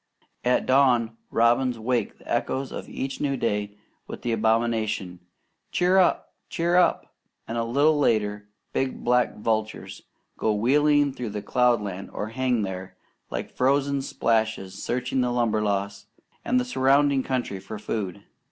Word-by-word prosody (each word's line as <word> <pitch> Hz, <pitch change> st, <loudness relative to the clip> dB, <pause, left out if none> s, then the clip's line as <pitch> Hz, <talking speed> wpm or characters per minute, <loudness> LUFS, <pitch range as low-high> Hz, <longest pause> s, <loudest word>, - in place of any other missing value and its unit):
At 125 Hz, +1 st, +2 dB
dawn, 125 Hz, -4 st, +3 dB
robins 120 Hz, +2 st, +2 dB
wake 120 Hz, +2 st, -1 dB
the -, -, -19 dB
echoes 130 Hz, 0 st, -1 dB
of -, -, -7 dB
each 135 Hz, 0 st, -4 dB
new 140 Hz, -2 st, 0 dB
day 105 Hz, -3 st, -2 dB, 0.3 s
with -, -, -8 dB
the 120 Hz, -, 0 dB
admonition, 110 Hz, -4 st, 0 dB, 0.5 s
"Cheer 180 Hz, +2 st, +3 dB
up! 185 Hz, -, +2 dB, 0.2 s
Cheer 170 Hz, +1 st, 0 dB
up!" 180 Hz, -, +2 dB, 0.3 s
and 115 Hz, -, -4 dB
a 115 Hz, -, 0 dB
little 145 Hz, +6 st, +3 dB
later 105 Hz, -5 st, 0 dB, 0.2 s
big 135 Hz, -1 st, -2 dB
black 125 Hz, 0 st, +2 dB
vultures 110 Hz, 0 st, -2 dB, 0.4 s
go 110 Hz, -1 st, +1 dB
wheeling 145 Hz, +5 st, +3 dB
through 110 Hz, -5 st, -4 dB
cloudland 105 Hz, -6 st, +1 dB
or 105 Hz, -, -4 dB
hang 125 Hz, -1 st, 0 dB
there, 95 Hz, -1 st, -6 dB, 0.3 s
like -, -, -5 dB
frozen 140 Hz, +1 st, +2 dB
splashes, 110 Hz, -7 st, -1 dB
searching 125 Hz, +1 st, -1 dB
the 125 Hz, -1 st, 0 dB
Limberlost 100 Hz, -4 st, -1 dB, 0.4 s
and 255 Hz, -, +2 dB
the 250 Hz, -, -1 dB
surrounding 140 Hz, -, +3 dB
country 125 Hz, -7 st, -2 dB
for 110 Hz, -, -8 dB
food. 100 Hz, -2 st, -4 dB
120 Hz, 140 wpm, -25 LUFS, 105-135 Hz, 0.5 s, dawn